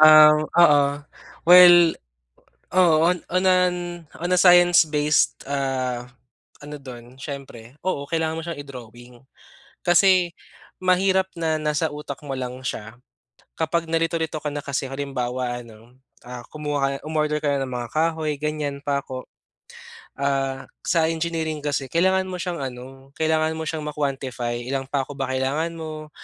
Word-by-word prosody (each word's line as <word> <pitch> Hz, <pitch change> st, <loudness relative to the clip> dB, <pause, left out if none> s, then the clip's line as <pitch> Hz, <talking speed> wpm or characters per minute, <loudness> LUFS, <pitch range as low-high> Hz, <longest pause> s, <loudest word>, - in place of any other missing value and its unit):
Ah, 155 Hz, 0 st, +9 dB
oo. 150 Hz, -2 st, +4 dB, 0.6 s
Well, 175 Hz, -1 st, +8 dB, 0.8 s
oo 180 Hz, -4 st, +5 dB
on 180 Hz, 0 st, 0 dB
on 185 Hz, +1 st, +2 dB
an 180 Hz, -1 st, +3 dB, 0.4 s
on 175 Hz, +2 st, -3 dB
a 180 Hz, -, +4 dB
science 175 Hz, -2 st, +6 dB
based, 150 Hz, -1 st, +1 dB
ah, 130 Hz, -3 st, -2 dB, 0.6 s
ano 150 Hz, 0 st, -7 dB
dun 125 Hz, -1 st, -11 dB
siyempre 135 Hz, -3 st, -9 dB
oo 145 Hz, -7 st, -1 dB
kailangan 160 Hz, -1 st, -1 dB
mo 165 Hz, -, -4 dB
siyang 165 Hz, -4 st, -5 dB
i-drawing. 125 Hz, -3 st, -11 dB, 0.7 s
Kasi 180 Hz, 0 st, +4 dB, 0.5 s
mahirap 190 Hz, +1 st, +2 dB
na 160 Hz, -2 st, -1 dB
nasa 150 Hz, 0 st, -1 dB
utak 145 Hz, -2 st, -7 dB
mo 135 Hz, -2 st, -4 dB
lang 125 Hz, 0 st, -5 dB
siya 110 Hz, -3 st, -5 dB, 0.6 s
kapag 165 Hz, +1 st, 0 dB
nalito-lito 165 Hz, -1 st, -1 dB
ka 150 Hz, -1 st, -4 dB
na 145 Hz, -, -4 dB
kasi 140 Hz, -1 st, -3 dB
halimbawa 125 Hz, -3 st, -3 dB
ano, 115 Hz, +2 st, -17 dB, 0.3 s
ah, 125 Hz, 0 st, -8 dB
kumuha 145 Hz, -2 st, -2 dB
ka -, -, -12 dB
umorder 150 Hz, -1 st, 0 dB
ka 140 Hz, -2 st, +1 dB
ng 135 Hz, -1 st, -3 dB
mga 120 Hz, -1 st, -4 dB
kahoy 160 Hz, -1 st, 0 dB
ganyan 150 Hz, -1 st, -3 dB
pako. 140 Hz, -3 st, -3 dB, 0.9 s
Ah, 135 Hz, -1 st, -1 dB, 0.2 s
sa 165 Hz, -3 st, +2 dB
engineering 160 Hz, -2 st, -3 dB
kasi 145 Hz, -2 st, -2 dB
kailangan 190 Hz, +2 st, +2 dB
mo 185 Hz, -1 st, -5 dB
siyang 175 Hz, -2 st, -3 dB
ano 135 Hz, +1 st, -8 dB
kailangan 160 Hz, 0 st, +1 dB
mo 160 Hz, -, -3 dB
siyang 160 Hz, -1 st, -3 dB
ma-quantify. 135 Hz, -5 st, -3 dB
Ilan 135 Hz, 0 st, -3 dB
pako 140 Hz, 0 st, -2 dB
ba 135 Hz, -, -1 dB
kailangan 140 Hz, +6 st, -1 dB
mo, 155 Hz, -1 st, -7 dB
150 Hz, 140 wpm, -23 LUFS, 135-165 Hz, 0.9 s, Ah